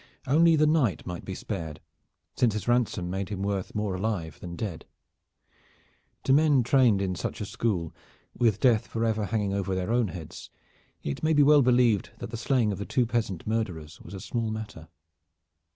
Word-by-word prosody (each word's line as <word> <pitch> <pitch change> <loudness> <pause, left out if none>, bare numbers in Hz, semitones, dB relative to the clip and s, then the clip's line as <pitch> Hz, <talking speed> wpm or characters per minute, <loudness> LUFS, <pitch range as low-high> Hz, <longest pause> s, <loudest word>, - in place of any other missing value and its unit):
Only 165 +4 +5
the 155 0 +4
knight 150 - +1
might 90 -2 -6
be 95 - -5
spared, 80 -8 -5 0.6
since 120 -4 +2
his 105 - -4
ransom 120 -7 +1
made 95 0 -3
him 100 -2 -4
worth 100 -2 -2
more 105 -2 -1
alive 90 -5 -3
than 85 -1 -7
dead. 90 -3 -5 1.4
To 135 - +3
men 145 -3 +4
trained 120 -5 +4
in 95 -1 -1
such 90 - -4
a - - -3
school, 90 -8 -2 0.4
with 110 -4 +2
death 120 -4 +3
forever 110 -2 -1
hanging 105 -2 -1
over 95 -1 -1
their 95 +3 -2
own 120 -2 +2
heads, 85 -3 -9 0.5
it 70 - -4
may 155 0 +2
be 145 -1 +5
well 145 0 +6
believed 120 -5 +3
that - - -7
the - - -4
slaying 120 -3 +1
of 100 +1 -5
two 125 - +2
peasant 110 -7 -2
murderers 90 -8 -3
was 90 - -10
a - - -6
small 115 +2 -2
matter. 110 -7 -6
105 Hz, 180 wpm, -27 LUFS, 95-120 Hz, 1.4 s, well